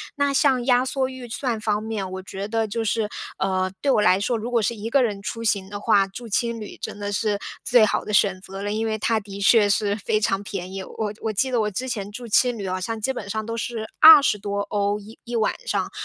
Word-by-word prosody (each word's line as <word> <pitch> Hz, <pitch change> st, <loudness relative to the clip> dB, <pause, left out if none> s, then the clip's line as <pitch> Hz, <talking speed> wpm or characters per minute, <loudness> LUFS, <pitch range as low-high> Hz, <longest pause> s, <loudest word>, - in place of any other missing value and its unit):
那 285 Hz, -1 st, +1 dB
像 265 Hz, -4 st, +3 dB
压 250 Hz, -1 st, +4 dB
缩 260 Hz, 0 st, -1 dB
预 260 Hz, -2 st, -9 dB
算 235 Hz, -2 st, -2 dB
方 210 Hz, -1 st, 0 dB
面， 215 Hz, -4 st, -4 dB
我 190 Hz, 0 st, -5 dB
觉 195 Hz, +2 st, -6 dB
得 225 Hz, 0 st, 0 dB
就 225 Hz, +2 st, -2 dB
是， 220 Hz, 0 st, 0 dB, 0.3 s
呃， 185 Hz, -1 st, 0 dB
对 285 Hz, -, 0 dB
我 215 Hz, -, +3 dB
来 185 Hz, -2 st, +4 dB
说， 235 Hz, +4 st, 0 dB
如 225 Hz, +2 st, -5 dB
果 235 Hz, -2 st, +2 dB
是 235 Hz, +3 st, 0 dB
一 220 Hz, +1 st, -5 dB
个 265 Hz, +2 st, +4 dB
人 205 Hz, -4 st, -2 dB
出 230 Hz, +3 st, -5 dB
行 200 Hz, -4 st, 0 dB
的 205 Hz, 0 st, -6 dB
话， 200 Hz, -1 st, +3 dB
住 230 Hz, +5 st, -9 dB
青 235 Hz, +1 st, -1 dB
旅 210 Hz, -, -8 dB
真 -, -, -6 dB
的 205 Hz, 0 st, -3 dB
是 205 Hz, -1 st, 0 dB, 0.2 s
最 240 Hz, -3 st, +5 dB
好 -, -, -1 dB
的 -, -, -6 dB
选 195 Hz, -2 st, +3 dB
择 195 Hz, +1 st, -8 dB
了， 205 Hz, -, -2 dB
因 220 Hz, +2 st, -1 dB
为 220 Hz, 0 st, -1 dB
它 220 Hz, +1 st, +1 dB
的 200 Hz, -1 st, -9 dB
确 205 Hz, +1 st, +5 dB
是 205 Hz, 0 st, +1 dB
非 215 Hz, +1 st, 0 dB
常 195 Hz, -2 st, 0 dB
便 190 Hz, -2 st, -6 dB
宜。 195 Hz, 0 st, -5 dB
我 210 Hz, +1 st, -4 dB
我 220 Hz, -, -1 dB
记 260 Hz, +6 st, 0 dB
得 240 Hz, -3 st, +2 dB
我 210 Hz, -, 0 dB
之 250 Hz, +7 st, -4 dB
前 205 Hz, -5 st, -4 dB
住 240 Hz, +3 st, -8 dB
青 245 Hz, +2 st, +3 dB
旅 200 Hz, -2 st, -5 dB
好 185 Hz, 0 st, -2 dB
像 225 Hz, +4 st, -3 dB
基 265 Hz, +5 st, -1 dB
本 205 Hz, -5 st, -7 dB
上 215 Hz, +1 st, -3 dB
都 230 Hz, +1 st, -4 dB
是 225 Hz, 0 st, -4 dB
20 305 Hz, -8 st, +9 dB
多 200 Hz, 0 st, -3 dB
欧 205 Hz, 0 st, 0 dB
一 215 Hz, +2 st, -14 dB
一 240 Hz, -, -6 dB
晚 220 Hz, -2 st, +1 dB
上， -, -, -1 dB
215 Hz, 275 characters per minute, -23 LUFS, 200-235 Hz, 0.3 s, 20